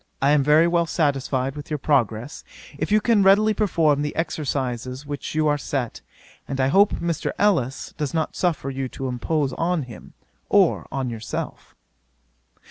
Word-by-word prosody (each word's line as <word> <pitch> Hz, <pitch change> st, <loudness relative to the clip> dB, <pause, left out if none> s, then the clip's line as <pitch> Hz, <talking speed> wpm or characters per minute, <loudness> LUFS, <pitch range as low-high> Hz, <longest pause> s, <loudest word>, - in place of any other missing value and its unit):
I 140 Hz, +2 st, +3 dB
am 150 Hz, -1 st, +4 dB
very 150 Hz, +4 st, +5 dB
well 170 Hz, -1 st, +1 dB
satisfied 135 Hz, -4 st, 0 dB
with 145 Hz, -, -8 dB
your 150 Hz, -, -1 dB
progress, 125 Hz, -3 st, 0 dB, 0.3 s
if 155 Hz, +6 st, -3 dB
you 215 Hz, -, +5 dB
can 220 Hz, -1 st, +3 dB
really 205 Hz, +3 st, +5 dB
perform 165 Hz, -9 st, +2 dB
the 150 Hz, 0 st, -3 dB
exercises 130 Hz, -5 st, -3 dB
which 145 Hz, +1 st, -6 dB
you 155 Hz, 0 st, +2 dB
are 145 Hz, 0 st, +1 dB
set; 130 Hz, -5 st, -3 dB, 0.5 s
and 135 Hz, -1 st, -4 dB
I 130 Hz, 0 st, +2 dB
hope 200 Hz, +7 st, +4 dB
Mr. 170 Hz, -2 st, -2 dB
Ellis 165 Hz, -11 st, 0 dB
does 150 Hz, -3 st, -1 dB
not 160 Hz, -2 st, -2 dB
suffer 160 Hz, -6 st, -1 dB
you 135 Hz, -1 st, -4 dB
to 135 Hz, -, -5 dB
impose 135 Hz, +3 st, -1 dB
on 170 Hz, -2 st, 0 dB
him, 120 Hz, -3 st, -12 dB, 0.4 s
or -, -, +3 dB
on 130 Hz, -3 st, -2 dB
yourself. 110 Hz, -2 st, -6 dB
145 Hz, 165 wpm, -23 LUFS, 135-165 Hz, 0.5 s, very